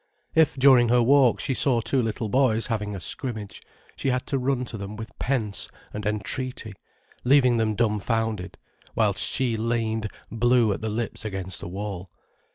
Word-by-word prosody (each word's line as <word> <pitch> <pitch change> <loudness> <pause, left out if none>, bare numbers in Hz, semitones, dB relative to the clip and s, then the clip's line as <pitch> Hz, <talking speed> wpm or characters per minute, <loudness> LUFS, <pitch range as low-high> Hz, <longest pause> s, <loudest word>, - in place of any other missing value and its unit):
If, 160 -3 +4
during 130 -3 +6
her 120 0 +4
walk, 135 -1 +4
she 135 - -1
saw 125 -2 +3
two 130 +3 0
little 110 -1 -2
boys 115 -1 +2
having 105 -3 -3
a - - -5
scrimmage, 110 - -5 0.3
she 135 - -2
had 125 -1 -1
to 135 - -1
run 125 0 0
to 120 - -8
them 100 +2 -6
with 110 0 -8
pence 115 -7 0 0.2
and 105 0 -4
entreaty, 110 +1 -3 0.5
leaving 125 -2 +4
them 110 -2 +1
dumfounded, 110 -2 -1 0.4
whilst - - +2
she 125 -3 0
leaned 110 -1 -1 0.2
blue 120 -1 +3
at 100 - -6
the 110 - -2
lips 110 +1 -3
against 95 -3 -5
a - - -6
wall. 95 0 -6
115 Hz, 165 wpm, -25 LUFS, 105-125 Hz, 0.5 s, during